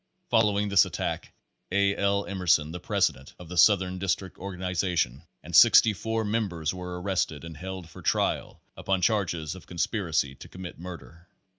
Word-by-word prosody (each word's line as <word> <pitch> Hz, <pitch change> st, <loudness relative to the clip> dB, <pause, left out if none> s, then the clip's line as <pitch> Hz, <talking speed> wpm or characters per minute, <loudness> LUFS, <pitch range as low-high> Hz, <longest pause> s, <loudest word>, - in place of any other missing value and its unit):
Following 105 Hz, -3 st, +3 dB
this 100 Hz, -, +6 dB
attack, -, -, -4 dB, 0.4 s
A. 100 Hz, +1 st, +2 dB
L. 100 Hz, 0 st, +1 dB
Emer 95 Hz, -2 st, -5 dB
son, 80 Hz, -1 st, +4 dB
the 90 Hz, -, -6 dB
president 70 Hz, -4 st, -1 dB
of 90 Hz, -2 st, -12 dB
the 90 Hz, -, -6 dB
southern 95 Hz, 0 st, +4 dB
district 95 Hz, 0 st, -2 dB
organization, 90 Hz, -7 st, -2 dB, 0.2 s
and -, -, -5 dB
sixty 110 Hz, -, +7 dB
four 110 Hz, +3 st, -2 dB
members 95 Hz, -8 st, -1 dB
were 90 Hz, -1 st, -6 dB
arrested 90 Hz, -5 st, -1 dB
and 85 Hz, -1 st, -8 dB
held 95 Hz, +2 st, -7 dB
for 85 Hz, -, -13 dB
trial -, -, -1 dB
upon 95 Hz, -2 st, -1 dB
charges 85 Hz, -9 st, 0 dB
of 95 Hz, -, -12 dB
conspiracy 85 Hz, -6 st, -1 dB
to 70 Hz, -, -12 dB
commit 90 Hz, -2 st, -9 dB
murder. 85 Hz, -1 st, -10 dB
90 Hz, 160 wpm, -27 LUFS, 85-100 Hz, 0.4 s, sixty